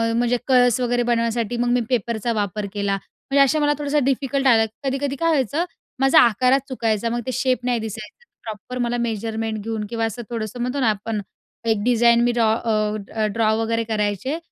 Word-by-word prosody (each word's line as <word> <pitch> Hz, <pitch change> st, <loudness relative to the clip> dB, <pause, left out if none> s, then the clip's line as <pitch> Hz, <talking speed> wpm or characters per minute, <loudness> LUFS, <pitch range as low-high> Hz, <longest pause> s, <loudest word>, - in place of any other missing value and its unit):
म्हणजे 240 Hz, +1 st, +2 dB
कळस 250 Hz, -2 st, +4 dB
वगैरे 245 Hz, 0 st, +1 dB
बनवण्यासाठी 235 Hz, -1 st, 0 dB
मग 240 Hz, 0 st, 0 dB
मी 245 Hz, 0 st, +3 dB
पेपरचा 235 Hz, -1 st, -1 dB
वापर 205 Hz, -1 st, -2 dB
केला, 200 Hz, -1 st, 0 dB
म्हणजे 275 Hz, +7 st, 0 dB
असं 290 Hz, +3 st, +2 dB
मला 295 Hz, 0 st, +3 dB
थोडासं 290 Hz, 0 st, 0 dB
डिफिकल्ट 270 Hz, +1 st, 0 dB
आला. 225 Hz, -3 st, +5 dB, 0.2 s
कधी-कधी 275 Hz, +1 st, -1 dB
काय 330 Hz, -, +2 dB
व्हायचं, 300 Hz, +2 st, +1 dB, 0.3 s
माझा 270 Hz, 0 st, +6 dB
आकारात 250 Hz, +3 st, +4 dB
चुकायचं, 230 Hz, -3 st, -1 dB
मग 240 Hz, -, -1 dB
तो 255 Hz, -, -2 dB
शेप 255 Hz, -1 st, +1 dB
नाही 245 Hz, -2 st, +1 dB
दिसायचा 220 Hz, -, -8 dB, 0.2 s
प्रॉपर. 220 Hz, +3 st, -7 dB
मला 240 Hz, 0 st, 0 dB
मेजरमेंट 220 Hz, -1 st, -3 dB
घेऊन 220 Hz, -1 st, -3 dB
किंवा 230 Hz, -1 st, -1 dB
असं 225 Hz, +2 st, -4 dB
थोडंसं 230 Hz, 0 st, -4 dB
म्हणतो 250 Hz, +3 st, -2 dB
ना, 245 Hz, -4 st, +3 dB
आपण 210 Hz, +1 st, -2 dB, 0.5 s
एक 220 Hz, -2 st, +1 dB
design 235 Hz, 0 st, +4 dB
me 240 Hz, -, +3 dB
draw 230 Hz, -2 st, +2 dB
a, 215 Hz, -1 st, -1 dB
draw 220 Hz, 0 st, +2 dB
वगैरे 230 Hz, 0 st, 0 dB
करायचे 215 Hz, -, -1 dB
235 Hz, 180 wpm, -22 LUFS, 220-255 Hz, 0.5 s, माझा